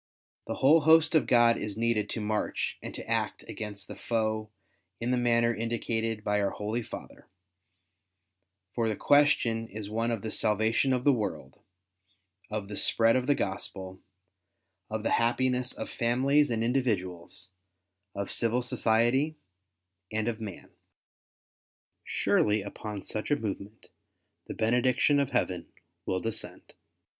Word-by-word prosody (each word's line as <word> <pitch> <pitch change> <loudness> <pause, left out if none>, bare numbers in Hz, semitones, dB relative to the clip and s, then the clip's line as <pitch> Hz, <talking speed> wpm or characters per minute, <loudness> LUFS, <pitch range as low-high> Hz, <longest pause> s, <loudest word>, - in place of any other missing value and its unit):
The - - -2
whole 155 +5 +5
host 160 +1 +5
of 155 - +3
God 120 -1 +5
is 105 -1 -5
needed 115 -2 +1
to 115 - -3
march 105 0 -2
and - - -6
to - - -7
act - - -1
against 105 -2 -7
the - - -8
foe 110 -2 -1 0.5
in 120 +2 -1
the - - +3
manner 120 -1 +3
indicated 115 -1 -2
by 105 -1 +1
our 100 -1 +1
Ploly 110 +3 -2
Father; - - -10 1.5
for 115 -2 0
the 110 - -1
question 120 -5 +3
is 105 -1 -7
one 115 +2 0
of 115 -4 -2
the 110 - -3
salvation 110 +4 +1
of 125 -1 +1
the 145 - +5
world, 105 - -4 0.9
of 105 -2 -3
the 105 - -6
spread 115 0 +3
of 130 0 0
the 145 - +4
Gospel, 95 -2 -4 0.9
of - - -3
the - - 0
happiness 125 +1 +1
of - - -6
families 135 +5 +2
and 115 -1 0
individuals, 95 -8 -1 0.6
of 100 0 -3
civil 120 +2 0
society, 125 +6 +1 0.7
and 110 +1 -1
of 115 -1 -2
man. 100 -5 -8 1.3
Surely 105 -1 +1
upon 100 0 -6
such 110 - -4
a 145 - +4
movement 105 -3 -6 0.6
the - - -6
bene 115 +3 +2
diction 130 +3 +3
of 140 -2 +1
Heaven 90 -9 -1 0.4
will 95 - 0
descend. 115 +2 -6
115 Hz, 145 wpm, -29 LUFS, 105-125 Hz, 1.5 s, whole